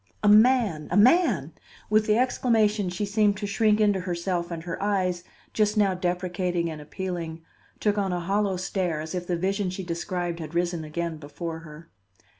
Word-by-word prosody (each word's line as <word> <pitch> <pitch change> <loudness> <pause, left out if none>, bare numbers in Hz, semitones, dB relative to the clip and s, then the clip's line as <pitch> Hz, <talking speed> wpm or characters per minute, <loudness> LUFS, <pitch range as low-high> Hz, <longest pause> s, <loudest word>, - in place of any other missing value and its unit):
"A - - +3
man! 215 -6 +4
a 180 - +1
man!" 330 - +4 0.3
With 215 0 +2
the 215 0 +3
exclamation 220 -5 +2
she 180 +4 -2
seemed 205 0 +2
to 205 - -4
shrink 210 +1 +2
into 205 -2 +3
herself 175 -1 -2
and 165 -2 -5
her 170 +1 -5
eyes, 185 -4 0 0.3
just 215 0 +1
now 200 -2 +3
deprecating 180 -1 -1
and 155 -1 -7
appealing, 165 0 -5 0.4
took 210 -1 +1
on 195 -2 0
a 180 - -1
hollow 195 +2 0
stare, 180 -3 -2
as 155 +1 -6
if 180 -1 -4
the 175 - 0
vision 195 +2 -1
she 185 +1 -5
described 175 0 -3
had 160 0 -7
risen 175 -1 0
again 165 +1 -4
before 160 +2 -6
her. 160 +1 -13
185 Hz, 180 wpm, -26 LUFS, 170-205 Hz, 0.4 s, man